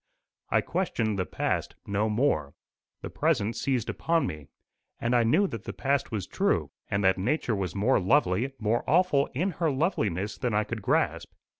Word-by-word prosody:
I - - +3
questioned 115 - -1
the 90 - -1
past - - -2
no 105 +2 0
more; 105 - 0 0.5
the - - -4
present 120 -9 +1
seized 125 -3 -1
upon 165 0 0
me, 75 -2 -6 0.5
and 120 +1 +1
I 120 - +5
knew 120 - +3
that 115 -2 -7
the 100 - -5
past 140 +8 0
was 105 -5 -2
true, - - 0 0.2
and 100 +1 0
that 95 0 +3
nature 120 +2 0
was 95 -2 -3
more 110 +7 +3
lovely, 110 +3 +2
more 115 +1 0
awful 155 -3 +3
in 180 +8 0
her 165 - +3
loveliness 110 - -1
than 125 -5 -1
I 105 - +3
could 110 0 -5
grasp. - - 0
115 Hz, 175 wpm, -28 LUFS, 100-140 Hz, 0.5 s, I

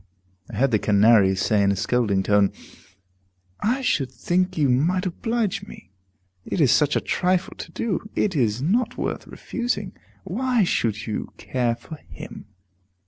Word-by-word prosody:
I - - -7
heard 130 +5 +2
the 110 - +3
Canary 105 -2 +5
say 100 +2 +2
in 100 0 +3
a - - 0
scolding 110 -2 +1
tone, 100 0 +3 1.1
"I 250 +6 0
should 140 - 0
think 180 +7 -1
you 150 -3 +3
might 165 +9 +2
oblige 205 +1 -2
me; - - -13 0.5
it - - -3
is 140 -6 +5
such 150 -1 +3
a - - +3
trifle 185 0 0
to - - -8
do, 210 -1 -3
it 200 -4 +1
is 120 -2 +1
not 220 +9 +1
worth - - -3
refusing. 205 -6 -3 0.3
Why 235 +4 +1
should 110 - 0
you 110 - -4
care 120 -2 -1
for 155 +7 -10
him!" - - -10
145 Hz, 155 wpm, -23 LUFS, -, 1.1 s, Canary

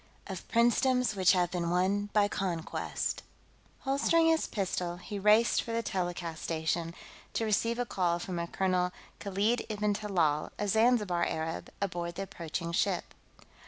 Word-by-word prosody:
Of 190 -4 -7
Princedoms 245 +1 +3
Which 185 -1 +5
Have 175 -2 +1
Been 175 -2 -1
Won 195 +4 +1
by 205 -1 +4
Conquest 180 -5 -2 0.6
Holstering 290 +5 +3
his 320 0 +2
pistol, 180 -3 -2
he 200 +3 -6
raced 210 +3 +4
for 230 - -5
the 230 0 0
telecast 175 -4 -3
station, 165 +1 -2 0.4
to 225 - 0
receive 230 +2 +1
a 245 - 0
call 180 -5 0
from 175 0 -4
a 170 - -2
Colonel 180 -1 +1 0.3
Khalid 205 +4 0
ib'n 210 -1 0
Talal, 175 -8 0
a 205 - -1
Zanzibar 210 -5 +3
Arab, 160 0 -3
aboard 175 -3 -3
the 195 - -3
approaching 170 -2 -5
ship. 180 +1 0
190 Hz, 150 wpm, -30 LUFS, 175-215 Hz, 0.6 s, Which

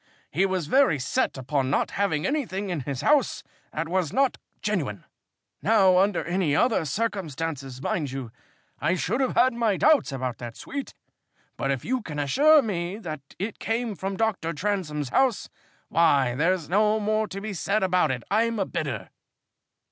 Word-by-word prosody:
He 190 +5 +2
was 185 -4 -1
very 260 - +4
set 135 +1 -1
upon 130 0 -1
not - - +1
having 190 -7 0
anything 205 -10 -2
in 170 - -1
his 135 -1 -4
house 290 -3 +2 0.3
that 165 +1 -3
was 175 -3 0
not 270 +1 +1 0.2
genuine. - - -2 0.6
Now 190 -5 +5
under 195 -3 +2
any 175 -3 +1
other 235 -6 +2
circumstances, 155 - -3
mind 150 -6 -1
you, 130 -3 -6 0.5
I - - +1
should 210 - -1
have 260 - 0
had 255 0 +4
my 230 -4 +1
doubts 300 - +4
about 130 -3 -3
that 120 -2 -7
suite, 280 -1 -6 0.6
but 135 - -2
if 135 -3 -1
you 255 +1 0
can 150 -8 -7
assure 285 - +5
me 185 -3 -3
that 155 -9 -6 0.2
it 205 +3 -4
came 225 0 -1
from 195 +1 -4
Dr. 195 -7 0
Transome's 150 -6 -2
house, 260 - +1 0.4
why, 140 -7 +3
there's 165 +4 +1
no 210 +4 +3
more 215 +1 0
to 195 - -6
be 210 +1 -5
said 200 +3 0
about 180 -4 +2
it. 125 -2 -2
I'm 230 +2 +2
a 195 - 0
bidder." 125 - -4
185 Hz, 170 wpm, -26 LUFS, 150-220 Hz, 0.6 s, Now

